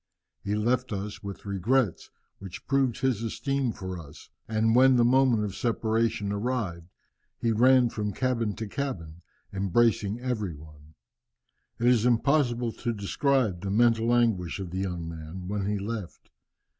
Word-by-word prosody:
He 100 Hz, +1 st, -1 dB
left 120 Hz, +4 st, 0 dB
us 100 Hz, 0 st, -5 dB
with 100 Hz, 0 st, -8 dB
regrets, 100 Hz, +2 st, 0 dB, 0.3 s
which 95 Hz, -2 st, -9 dB
proved 135 Hz, -3 st, +1 dB
his 130 Hz, -5 st, +1 dB
esteem 135 Hz, +3 st, -1 dB
for 95 Hz, -3 st, -6 dB
us, 75 Hz, -3 st, -13 dB, 0.2 s
and 110 Hz, 0 st, +1 dB
when 130 Hz, +1 st, +6 dB
the 120 Hz, -1 st, +4 dB
moment 125 Hz, -3 st, +4 dB
of 100 Hz, -2 st, -3 dB
separation 115 Hz, -3 st, 0 dB
arrived, 100 Hz, -6 st, -2 dB, 0.5 s
he 115 Hz, -, +1 dB
ran 125 Hz, +2 st, +5 dB
from 105 Hz, -2 st, -3 dB
cabin 115 Hz, -2 st, -1 dB
to 110 Hz, -1 st, -5 dB
cabin 90 Hz, -, -5 dB, 0.3 s
embracing 100 Hz, +2 st, +1 dB
every 110 Hz, -9 st, -3 dB
one. 75 Hz, 0 st, -15 dB, 0.8 s
It 120 Hz, -, -2 dB
is 120 Hz, -3 st, +4 dB
impossible 125 Hz, -1 st, +2 dB
to 120 Hz, -2 st, -1 dB
describe 110 Hz, -1 st, 0 dB
the 100 Hz, -, -4 dB
mental 115 Hz, +2 st, +3 dB
anguish 110 Hz, -8 st, +1 dB
of 95 Hz, -3 st, -6 dB
the 95 Hz, -, -3 dB
young 90 Hz, -3 st, -3 dB
man 80 Hz, +3 st, -8 dB
when 100 Hz, 0 st, -2 dB
he 105 Hz, 0 st, 0 dB
left. 105 Hz, -2 st, -6 dB
110 Hz, 150 wpm, -27 LUFS, 95-120 Hz, 0.8 s, when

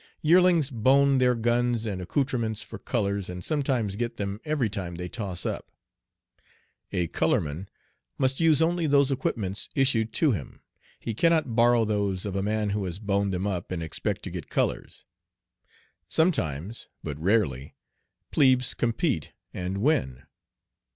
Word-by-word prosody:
Yearlings 170 Hz, -3 st, +4 dB
"bone" 135 Hz, +3 st, +4 dB
their 125 Hz, -1 st, +3 dB
guns 120 Hz, 0 st, +1 dB
and 100 Hz, -4 st, -3 dB
accoutrements 115 Hz, 0 st, -1 dB
for -, -, -9 dB
"colors," 100 Hz, -5 st, -1 dB
and 90 Hz, 0 st, -6 dB
sometimes 130 Hz, -9 st, 0 dB
get 120 Hz, +1 st, -3 dB
them 100 Hz, +1 st, -4 dB
every 150 Hz, -6 st, 0 dB
time 95 Hz, -5 st, -5 dB
they 90 Hz, +1 st, -5 dB
toss 95 Hz, -3 st, -4 dB
up. -, -, -4 dB, 1.2 s
A 90 Hz, -, 0 dB
"color -, -, +1 dB
man" 80 Hz, +6 st, -6 dB, 0.5 s
must 130 Hz, 0 st, +1 dB
use 160 Hz, -1 st, +4 dB
only 170 Hz, 0 st, +1 dB
those 140 Hz, -1 st, +4 dB
equipments 105 Hz, -7 st, -1 dB
issued 120 Hz, -5 st, +2 dB
to 155 Hz, -4 st, +3 dB
him. 85 Hz, -, -6 dB, 0.4 s
He 115 Hz, -, -4 dB
cannot 160 Hz, -2 st, +2 dB
borrow 120 Hz, -1 st, +4 dB
those 100 Hz, -3 st, -1 dB
of 100 Hz, -2 st, -4 dB
a 100 Hz, -, 0 dB
man 105 Hz, 0 st, 0 dB
who 100 Hz, 0 st, -1 dB
has 90 Hz, -1 st, -4 dB
"boned 100 Hz, -1 st, 0 dB
them 95 Hz, +1 st, -2 dB
up" 90 Hz, -4 st, -3 dB
and 85 Hz, -3 st, -3 dB
expect 80 Hz, -, -3 dB
to -, -, -6 dB
get -, -, -7 dB
colors. -, -, -2 dB, 1.0 s
Sometimes 105 Hz, -, 0 dB, 0.2 s
but 75 Hz, 0 st, -5 dB
rarely 80 Hz, -, 0 dB, 0.6 s
plebes 130 Hz, -4 st, +3 dB
compete 115 Hz, -, -1 dB, 0.2 s
and 95 Hz, +3 st, -3 dB
win. 65 Hz, -, +1 dB
110 Hz, 150 wpm, -26 LUFS, 95-135 Hz, 1.2 s, Yearlings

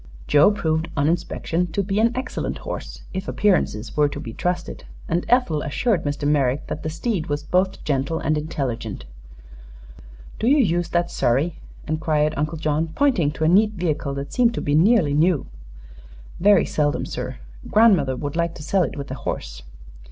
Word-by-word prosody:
Joe 150 Hz, +4 st, +5 dB
proved 160 Hz, -5 st, -1 dB
on 140 Hz, 0 st, +2 dB
inspection 175 Hz, +1 st, -1 dB
to 200 Hz, -, 0 dB
be 195 Hz, +2 st, -1 dB
an 230 Hz, +1 st, +4 dB
excellent 255 Hz, 0 st, -3 dB
horse, -, -, -7 dB
if 190 Hz, +1 st, -4 dB
appearances 150 Hz, -, 0 dB
were 150 Hz, -1 st, +3 dB
to -, -, -6 dB
be 115 Hz, -, -7 dB
trusted, 175 Hz, +4 st, -3 dB, 0.2 s
and 170 Hz, +1 st, -1 dB
Ethel 235 Hz, -12 st, +2 dB
assured 180 Hz, -, 0 dB
Mr. 145 Hz, 0 st, -1 dB
Merrick 140 Hz, -1 st, +1 dB
that 155 Hz, -, -5 dB
the 155 Hz, -, -3 dB
steed 170 Hz, +1 st, -2 dB
was 145 Hz, 0 st, -2 dB
both 185 Hz, +4 st, 0 dB
gentle 140 Hz, +2 st, -1 dB
and 155 Hz, 0 st, 0 dB
intelligent. 130 Hz, -, -4 dB, 1.3 s
"Do 225 Hz, -, 0 dB
you 285 Hz, +4 st, +5 dB
use 175 Hz, -, +1 dB
that 175 Hz, 0 st, 0 dB
surrey?" 140 Hz, +8 st, 0 dB, 0.3 s
inquired 155 Hz, -1 st, +1 dB
Uncle 150 Hz, +3 st, -2 dB
John, 155 Hz, +1 st, 0 dB
pointing 255 Hz, -, +2 dB
to 160 Hz, -, -4 dB
a -, -, +4 dB
neat 210 Hz, +5 st, +4 dB
vehicle 155 Hz, -7 st, -2 dB
that 140 Hz, +1 st, -6 dB
seemed 235 Hz, -2 st, +3 dB
to -, -, -2 dB
be 145 Hz, -, -1 dB
nearly 170 Hz, -1 st, +4 dB
new. 155 Hz, +1 st, +2 dB, 0.9 s
"Very 200 Hz, -1 st, +5 dB
seldom, 145 Hz, -1 st, 0 dB
sir. -, -, -5 dB, 0.3 s
Grandmother 190 Hz, -, +4 dB
would 145 Hz, +2 st, -5 dB
like 170 Hz, 0 st, -1 dB
to -, -, -9 dB
sell 190 Hz, +5 st, +1 dB
it 165 Hz, -, -2 dB
with 140 Hz, 0 st, -6 dB
the -, -, -4 dB
horse." -, -, -5 dB
160 Hz, 175 wpm, -22 LUFS, 145-185 Hz, 1.3 s, Joe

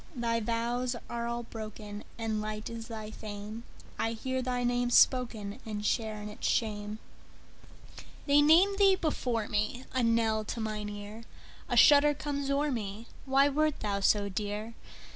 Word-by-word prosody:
Thy 230 Hz, -2 st, 0 dB
vows 235 Hz, +2 st, -1 dB, 0.2 s
are 235 Hz, 0 st, -2 dB
all 235 Hz, 0 st, -3 dB
broken, 215 Hz, -2 st, -8 dB
And 220 Hz, -2 st, -2 dB
light 215 Hz, +1 st, -5 dB
is 230 Hz, -1 st, -7 dB
thy 220 Hz, -2 st, -7 dB
fame:I 215 Hz, +2 st, -6 dB
hear 260 Hz, +3 st, -2 dB
thy 250 Hz, -1 st, -1 dB
name 245 Hz, 0 st, +1 dB
spokenAnd 215 Hz, -4 st, +2 dB
share 220 Hz, -2 st, 0 dB
in 210 Hz, -, -6 dB
its 210 Hz, -, -4 dB
shame. 210 Hz, -1 st, -1 dB, 1.3 s
They 285 Hz, 0 st, +5 dB
name 350 Hz, +7 st, +5 dB
thee 390 Hz, -1 st, +6 dB
before 250 Hz, -, -1 dB
me,A 245 Hz, +5 st, -2 dB
knell 230 Hz, -2 st, +2 dB
to 230 Hz, -, -4 dB
mine 215 Hz, -1 st, -3 dB
ear;A 210 Hz, +2 st, -8 dB
shudder 295 Hz, 0 st, +7 dB
comes 285 Hz, -1 st, -3 dB
o'er 285 Hz, +1 st, +1 dB
me—Why 235 Hz, +5 st, 0 dB
wert 305 Hz, +1 st, 0 dB
thou 200 Hz, -2 st, -1 dB
so 200 Hz, +1 st, +3 dB
dear? 210 Hz, +3 st, -4 dB
230 Hz, 140 wpm, -30 LUFS, 215-255 Hz, 1.3 s, shudder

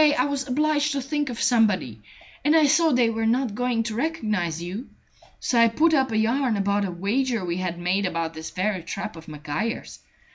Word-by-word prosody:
I 290 Hz, -4 st, +4 dB
was 280 Hz, -1 st, -2 dB
obliged 295 Hz, +2 st, +1 dB
to 280 Hz, -, -1 dB
think 290 Hz, +1 st, -2 dB
of 240 Hz, -, -5 dB
somebody, 205 Hz, -, +2 dB, 0.4 s
and 300 Hz, +3 st, +3 dB
I 315 Hz, -2 st, +6 dB
saw 315 Hz, +3 st, +4 dB
they 245 Hz, -3 st, +3 dB
were 225 Hz, 0 st, -1 dB
not 240 Hz, -1 st, +1 dB
going 245 Hz, 0 st, 0 dB
to 225 Hz, -1 st, -4 dB
recognize 215 Hz, -, -1 dB
you. 185 Hz, +9 st, -6 dB, 0.5 s
So 240 Hz, -, +1 dB
I 230 Hz, -, +7 dB
put 315 Hz, +9 st, +2 dB
up 265 Hz, -4 st, +2 dB
a 220 Hz, -, 0 dB
yarn 230 Hz, +1 st, +1 dB
about 200 Hz, +1 st, +1 dB
a -, -, -3 dB
wager 215 Hz, +4 st, -1 dB
we 170 Hz, 0 st, -2 dB
had 185 Hz, -2 st, -3 dB
made 185 Hz, +3 st, 0 dB
about 165 Hz, -2 st, -3 dB
this 160 Hz, 0 st, -7 dB
very 190 Hz, 0 st, -1 dB
trap 180 Hz, +2 st, -5 dB
of 160 Hz, 0 st, -12 dB
Maguire's. 150 Hz, +9 st, -4 dB
225 Hz, 205 wpm, -24 LUFS, 185-270 Hz, 0.5 s, I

